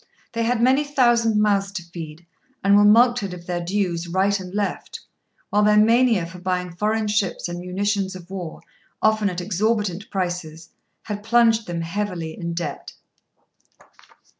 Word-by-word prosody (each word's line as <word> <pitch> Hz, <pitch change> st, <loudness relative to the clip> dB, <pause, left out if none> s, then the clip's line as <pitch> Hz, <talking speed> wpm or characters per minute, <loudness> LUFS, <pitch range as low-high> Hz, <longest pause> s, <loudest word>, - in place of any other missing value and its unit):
They 230 Hz, -, -3 dB
had 235 Hz, 0 st, +1 dB
many 265 Hz, +4 st, +4 dB
thousand 240 Hz, -6 st, +2 dB
mouths 200 Hz, -2 st, +2 dB
to 185 Hz, -3 st, -5 dB
feed, 165 Hz, -1 st, -9 dB, 0.4 s
and 200 Hz, 0 st, +5 dB
were 205 Hz, -, +6 dB
mulcted 215 Hz, -2 st, +4 dB
of 175 Hz, -1 st, -12 dB
their 175 Hz, -1 st, -3 dB
dues 175 Hz, -2 st, -1 dB
right 195 Hz, +3 st, +1 dB
and 180 Hz, -1 st, -8 dB
left; 205 Hz, +1 st, -3 dB, 0.5 s
while 210 Hz, -, +3 dB
their 210 Hz, 0 st, +4 dB
mania 225 Hz, -3 st, +4 dB
for 175 Hz, +2 st, -10 dB
buying 180 Hz, -1 st, -2 dB
foreign 215 Hz, +3 st, 0 dB
ships 210 Hz, -3 st, -1 dB
and 175 Hz, 0 st, -5 dB
munitions 190 Hz, +1 st, -2 dB
of 180 Hz, 0 st, -11 dB
war, 180 Hz, -4 st, -6 dB, 0.4 s
often 215 Hz, -1 st, +2 dB
at 180 Hz, -1 st, -4 dB
exorbitant 205 Hz, 0 st, -1 dB
prices, 175 Hz, -4 st, -4 dB, 0.3 s
had 205 Hz, -1 st, -5 dB
plunged 225 Hz, 0 st, +3 dB
them 170 Hz, -1 st, -3 dB
heavily 170 Hz, -2 st, -4 dB
in 170 Hz, -1 st, -5 dB
debt. 160 Hz, -4 st, -5 dB
200 Hz, 155 wpm, -22 LUFS, 175-215 Hz, 0.5 s, were